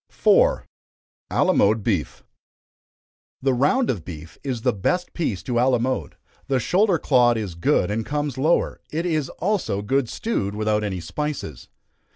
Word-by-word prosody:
4. -, -, +3 dB, 0.6 s
Alamode 110 Hz, -, +3 dB
Beef. 95 Hz, -, -2 dB, 1.2 s
The 135 Hz, 0 st, +1 dB
round 145 Hz, -, +2 dB
of 95 Hz, -9 st, -5 dB
beef 80 Hz, -1 st, -10 dB
is 125 Hz, -5 st, -3 dB
the -, -, +2 dB
best 180 Hz, -, -1 dB
piece 105 Hz, -, -2 dB
to 120 Hz, +3 st, -1 dB
alamode 125 Hz, 0 st, 0 dB, 0.3 s
the 135 Hz, -2 st, +1 dB
shoulder 185 Hz, -, +2 dB
clod 120 Hz, -6 st, +3 dB
is 105 Hz, -5 st, -4 dB
good, 85 Hz, +3 st, +1 dB
and 110 Hz, +2 st, -1 dB
comes 145 Hz, 0 st, -2 dB
lower; 155 Hz, +6 st, +1 dB
it 165 Hz, +3 st, -2 dB
is 155 Hz, -6 st, 0 dB
also 180 Hz, -, -1 dB
good 135 Hz, +2 st, 0 dB
stewed, 105 Hz, -, -2 dB
without 105 Hz, 0 st, 0 dB
any 95 Hz, -4 st, -3 dB
spices. 135 Hz, -, -5 dB
125 Hz, 145 wpm, -23 LUFS, 105-155 Hz, 1.2 s, 4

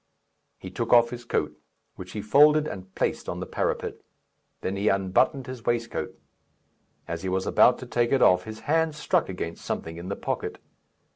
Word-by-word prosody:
He 95 Hz, -, -9 dB
took 115 Hz, +5 st, -3 dB
off 120 Hz, -1 st, +6 dB
his 120 Hz, -1 st, -7 dB
coat, 75 Hz, -9 st, -1 dB, 0.4 s
which 90 Hz, 0 st, -9 dB
he 105 Hz, -, -4 dB
folded 150 Hz, +6 st, +5 dB
and 95 Hz, 0 st, -8 dB
placed -, -, -1 dB
on -, -, -4 dB
the -, -, -4 dB
parapet; -, -, -2 dB, 0.6 s
then 95 Hz, -, -2 dB
he 100 Hz, +2 st, -1 dB
unbuttoned 100 Hz, +8 st, +2 dB
his 130 Hz, -2 st, -8 dB
waistcoat. 120 Hz, -1 st, -2 dB, 0.9 s
As 85 Hz, -1 st, -4 dB
he 95 Hz, -, -3 dB
was 95 Hz, 0 st, -1 dB
about 125 Hz, -, +5 dB
to -, -, -8 dB
take 120 Hz, -1 st, 0 dB
it 135 Hz, -2 st, +4 dB
off, 90 Hz, 0 st, +5 dB
his 110 Hz, 0 st, -8 dB
hand 160 Hz, +1 st, +1 dB
struck 150 Hz, -, 0 dB
against 85 Hz, -3 st, -5 dB
something 80 Hz, 0 st, -4 dB
in 85 Hz, +2 st, -7 dB
the 100 Hz, -, -2 dB
pocket. -, -, -3 dB
110 Hz, 185 wpm, -26 LUFS, 95-125 Hz, 0.9 s, off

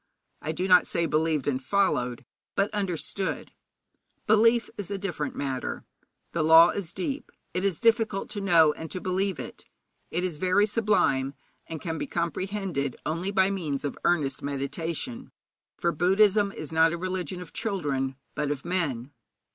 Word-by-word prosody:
I 155 Hz, -, -2 dB
do 180 Hz, +4 st, -2 dB
not 180 Hz, -1 st, +6 dB
say 170 Hz, -, +1 dB
believed 155 Hz, -2 st, +1 dB
and 135 Hz, -2 st, 0 dB
followed, 130 Hz, -7 st, 0 dB, 0.3 s
but 200 Hz, +2 st, +1 dB
understood. 195 Hz, -1 st, -2 dB, 0.7 s
Belief 230 Hz, +2 st, +4 dB
is 205 Hz, -4 st, -6 dB
a 200 Hz, -, -2 dB
different 175 Hz, -6 st, -3 dB
matter. 135 Hz, -2 st, -3 dB, 0.5 s
'The 170 Hz, -, -1 dB
law 160 Hz, +2 st, +8 dB
is 185 Hz, -5 st, -4 dB
deep; 270 Hz, +10 st, -4 dB, 0.2 s
it 180 Hz, +2 st, -1 dB
is 195 Hz, -5 st, 0 dB
difficult 225 Hz, -4 st, +2 dB
to 205 Hz, -1 st, -4 dB
know 165 Hz, -6 st, +5 dB
and 160 Hz, +1 st, -8 dB
to 185 Hz, -, -4 dB
believe 190 Hz, 0 st, -1 dB
it. -, -, -8 dB, 0.4 s
It 175 Hz, -, -2 dB
is 175 Hz, -4 st, -2 dB
very 185 Hz, +5 st, +3 dB
sublime, 200 Hz, -, +1 dB, 0.3 s
and 160 Hz, -1 st, -5 dB
can 160 Hz, -1 st, -4 dB
be -, -, -3 dB
comprehended 170 Hz, -4 st, -2 dB
only 165 Hz, +5 st, -2 dB
by 195 Hz, -1 st, +3 dB
means 155 Hz, -8 st, -3 dB
of 145 Hz, -, -3 dB
earnest 150 Hz, -6 st, +1 dB
meditation,' 160 Hz, -, -4 dB, 0.5 s
for 170 Hz, -, +1 dB
Buddhism 200 Hz, +4 st, +3 dB
is 155 Hz, -5 st, -7 dB
not 160 Hz, 0 st, +4 dB
a -, -, -2 dB
religion 185 Hz, -1 st, -3 dB
of 180 Hz, -3 st, -10 dB
children, 145 Hz, -, -1 dB, 0.2 s
but 150 Hz, -1 st, -1 dB
of 145 Hz, 0 st, -3 dB
men. 145 Hz, -8 st, -2 dB
175 Hz, 160 wpm, -27 LUFS, 150-195 Hz, 0.7 s, law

